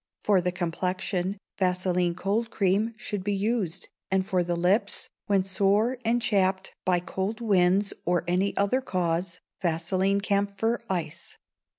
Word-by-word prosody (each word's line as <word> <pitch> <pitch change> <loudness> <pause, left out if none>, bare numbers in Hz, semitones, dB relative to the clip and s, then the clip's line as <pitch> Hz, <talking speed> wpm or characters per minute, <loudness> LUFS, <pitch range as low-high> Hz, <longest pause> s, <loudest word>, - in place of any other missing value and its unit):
For 200 -3 +4
the 180 0 0
complexion, 180 +2 -2 0.2
vaseline 180 -2 +1
cold 205 +5 -1
cream 210 +2 +1
should 205 -2 -4
be 205 +1 0
used, 205 -4 -1 0.2
and 190 0 +1
for 185 -2 +1
the 175 0 -1
lips, 195 +4 +1 0.2
when 195 -2 +3
sore 205 +6 +2
and 230 +1 +2
chapped 190 -4 +1
by 180 -1 +3
cold 190 +5 -3
winds 195 -2 +3
or 175 0 +1
any 185 +3 +1
other 200 +7 +2
cause, 175 -4 -1 0.2
vaseline 185 +3 +1
camphor 200 +3 0
ice. 170 -5 -3
190 Hz, 135 wpm, -27 LUFS, 180-205 Hz, 0.2 s, For